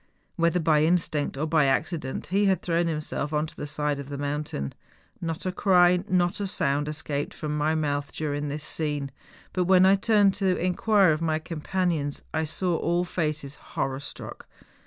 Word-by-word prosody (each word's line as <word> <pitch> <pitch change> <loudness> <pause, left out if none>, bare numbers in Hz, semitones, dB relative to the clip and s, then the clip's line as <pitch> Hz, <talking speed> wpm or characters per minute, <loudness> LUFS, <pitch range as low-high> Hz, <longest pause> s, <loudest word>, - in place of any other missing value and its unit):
Whether 170 -1 +2
by 155 -2 +3
in¬ 160 +3 +4
stinct 150 -5 -1
or 150 - 0
by 155 -2 +3
accident 135 0 -1
he 205 +1 +3
had 190 -3 +2
thrown 170 0 +1
himself 150 -2 -2
on 150 +1 +1
to 160 - -10
the 150 - -5
side 145 0 -1
of 140 0 -7
the 140 - -5
mountain. 145 - -3 0.5
Not 165 0 -4
a 185 - 0
cry, 180 -1 +4
not 175 0 +1
a 200 - -1
sound 145 -6 0
es¬ 150 0 -3
caped 145 -1 -3
from 150 -1 -3
my 150 +1 +1
mouth 145 -2 -1
during 145 -1 -3
this 145 +1 -4
scene. 145 -3 -3 0.4
But 180 -1 +1
when 185 0 +6
I 190 - +6
turned 205 -1 +4
to 190 -2 +2
inquire 185 +1 +3
of 155 +1 -1
my 160 -1 +1
companions 160 -2 -2
I 160 0 0
saw 170 +2 -1
all 175 +2 +1
faces 155 -5 -2 0.2
horror 135 0 -1
struck. 140 - -9
155 Hz, 190 wpm, -26 LUFS, 145-180 Hz, 0.5 s, when